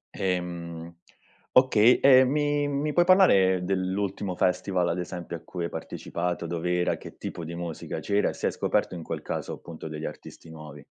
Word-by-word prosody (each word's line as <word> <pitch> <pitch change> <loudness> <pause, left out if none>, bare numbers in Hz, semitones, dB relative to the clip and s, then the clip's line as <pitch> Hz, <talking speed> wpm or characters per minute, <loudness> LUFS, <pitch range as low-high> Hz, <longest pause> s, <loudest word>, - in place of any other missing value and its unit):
Ehm, 85 -2 -3 0.6
okay, 125 -2 +5
ehm, 130 -1 +6
mi 145 0 +1
mi 145 +1 -1
puoi 175 - +5
parlare 100 - +5
dell'ultimo 95 +1 -2
festival, 90 0 +1
ad 90 - -1
esempio, 90 -1 -5
a - - -17
cui 90 -2 -5
hai 85 - -2
partecipato? 90 0 -4
Dov'era, 90 +1 -1
che - - -12
tipo 85 - -6
di 85 +2 -6
musica 85 -2 -5
c'era, 100 0 +1
e - - -5
se - - -4
hai - - +2
scoperto - - 0
in 85 - -6
quel - - -5
caso, - - -4
appunto, 80 -1 -9
degli 75 0 -6
artisti 80 - -9
nuovi? 75 -2 -11
90 Hz, 175 wpm, -26 LUFS, 85-105 Hz, 0.6 s, ehm